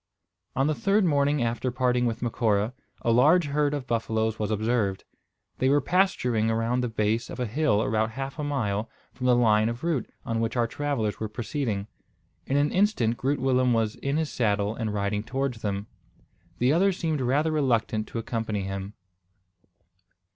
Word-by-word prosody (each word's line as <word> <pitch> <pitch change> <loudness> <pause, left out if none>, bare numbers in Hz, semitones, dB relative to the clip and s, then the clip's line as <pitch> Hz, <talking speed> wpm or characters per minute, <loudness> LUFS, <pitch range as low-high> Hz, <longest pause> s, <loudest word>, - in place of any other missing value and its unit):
On 135 - +2
the 155 - +2
third 195 - +2
morning 145 -3 +2
after 120 +2 -1
parting 125 -1 +1
with 115 +1 -3
Macora 110 -2 +1 0.3
a 115 - +2
large 150 +9 +5
herd 145 0 +1
of 140 -3 -4
buffaloes 110 -2 -1
was 105 -1 -1
observed. 110 -2 0 0.6
They 130 - +3
were 145 +1 +4
pasturing 130 - +1
around 115 +2 0
the 125 - 0
base 110 +1 0
of - - -7
a 125 - 0
hill 120 -2 +1
about 110 0 +1
half 135 +4 -5
a - - -1
mile 115 -7 -1 0.2
from 125 - -3
the 125 - +5
line 110 -2 +4
of 115 +4 -6
route 160 -8 -1 0.2
on 115 0 -1
which 115 +2 -1
our 120 - +3
travellers 120 -4 -2
were 110 - -3
proceeding. 110 -2 -3 0.6
In 135 - +1
an 145 +1 +2
instant 185 - +2
Groot 135 +4 -1
Willem 130 -1 +2
was 110 -2 +1
in 140 +2 -1
his 160 -2 -1
saddle 105 -3 0
and 110 -2 -3
riding 105 0 -1
towards 130 0 -3
them. 100 -1 -2 0.7
The 125 +4 +3
others 190 +2 +3
seemed 160 -4 -1
rather 145 +6 +1
reluctant 115 -7 +1
to - - -6
accompany 110 -3 -2
him. 95 +2 -5
120 Hz, 175 wpm, -26 LUFS, 110-140 Hz, 0.7 s, large